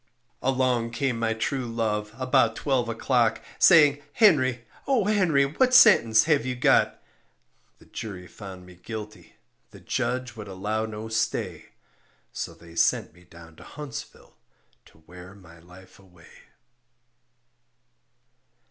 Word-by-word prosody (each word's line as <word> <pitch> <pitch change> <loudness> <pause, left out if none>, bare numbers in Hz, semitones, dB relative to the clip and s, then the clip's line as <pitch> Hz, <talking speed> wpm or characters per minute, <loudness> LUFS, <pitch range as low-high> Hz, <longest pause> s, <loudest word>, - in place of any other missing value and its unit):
Along 125 -3 0
came 120 0 -2
my 115 -1 -1
true 125 +3 -3
love, 105 -2 -2
about 125 -3 +2
twelve 130 -5 -1
o'clock, 115 0 +1 0.2
Saying, 145 -5 +6
"Henry, 130 - +3 0.2
O 255 -7 +2
Henry, 180 -9 +2
what 255 - +1
sentence 115 - +6
have 150 -6 +1
you 130 0 -3
got?" 125 - +2 0.8
The - - -21
jury 95 -5 -8
found 95 0 -11
me 90 - -14
guilty, 105 -4 -9 0.3
the - - -15
judge 125 -1 -3
would 105 -2 -9
allow 105 +3 -3
no 110 0 -7
stay, 110 0 -3 0.6
So - - -6
they 85 -1 -16
sent - - +1
me 90 +1 -21
down 85 -2 -16
to - - -13
Huntsville 150 -4 -10 0.5
to 80 - -23
wear 90 +3 -13
my 85 -4 -17
life 90 +3 -17
away. 90 -4 -20
115 Hz, 130 wpm, -25 LUFS, 95-130 Hz, 0.8 s, Saying